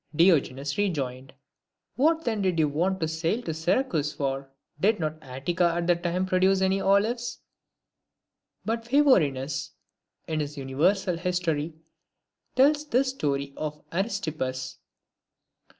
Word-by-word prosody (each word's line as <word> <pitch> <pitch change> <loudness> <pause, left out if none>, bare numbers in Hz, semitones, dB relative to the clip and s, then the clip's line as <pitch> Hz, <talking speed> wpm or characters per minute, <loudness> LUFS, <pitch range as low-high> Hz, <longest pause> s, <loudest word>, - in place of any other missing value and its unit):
Diogenes 145 -3 +2
rejoined, 135 -9 -2 0.4
" - - -58
What 320 +4 +2
then 220 -3 0
did 185 -3 +1
you 155 -2 +3
want 175 +6 0
to 160 - +1
sail 165 +9 -1
to 160 - -3
Syracuse 160 - 0
for? 135 -1 -3 0.3
Did 210 +5 +3
not 155 -1 -3
Attica 165 +6 0
at 175 0 -1
that 175 0 +2
time 180 +1 0
produce 185 +1 +3
any 190 +1 +2
olives 220 +5 +1 0.6
?" - - -53
But 230 +1 -1
Phavorinus, 150 - +2 0.6
in 155 -1 -1
his 150 0 -4
Universal 170 +7 +1
History, 170 -3 -1 0.8
tells 295 +3 +4
this 260 0 +2
story 140 - -2
of 150 -1 -5
Aristippus. 155 - -3
170 Hz, 130 wpm, -27 LUFS, 145-195 Hz, 0.8 s, tells